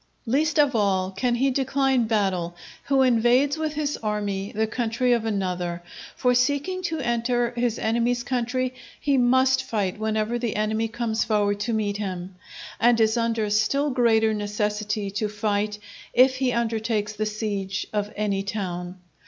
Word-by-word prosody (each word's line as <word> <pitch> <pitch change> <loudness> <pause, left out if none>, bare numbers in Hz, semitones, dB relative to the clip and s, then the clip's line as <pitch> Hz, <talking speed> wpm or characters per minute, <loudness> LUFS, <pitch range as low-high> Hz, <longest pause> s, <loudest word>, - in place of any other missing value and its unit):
Least 295 +7 +1
of 290 -4 +4
all 190 -3 +1
can 240 +5 0
he 265 +3 +2
decline 265 -1 +1
battle 190 -6 0 0.3
who 270 -1 +3
invades 250 +3 +3
with 315 -1 -2
his 295 -1 -2
army 205 -2 -2
the 220 +1 0
country 240 +2 0
of 230 -2 0
another; 180 -4 -2 0.3
for 250 0 +2
seeking 285 +9 +1
to 330 -3 -2
enter 240 0 0
his 240 -2 -1
enemy's 235 +2 0
country, 255 0 -1 0.3
he 285 -1 +1
must 260 +1 +3
fight 210 -6 -2
whenever 220 +2 -1
the 235 -3 -2
enemy 215 +1 0
comes 225 -1 -1
forward 205 -2 +1
to 225 +3 -1
meet 205 -2 -1
him; 185 -2 -5 0.5
and 235 0 +4
is 220 0 +3
under 230 -2 0
still 275 +7 +2
greater 225 -3 +3
necessity 210 0 -2
to 210 +1 -2
fight, 210 0 -1 0.4
if 255 +1 +5
he 260 -1 +1
undertake 225 -2 -1
the 215 +1 -1
siege 205 -3 -3
of 210 0 -1
any 205 -2 0
town. 185 -3 -4
225 Hz, 155 wpm, -24 LUFS, 210-250 Hz, 0.5 s, if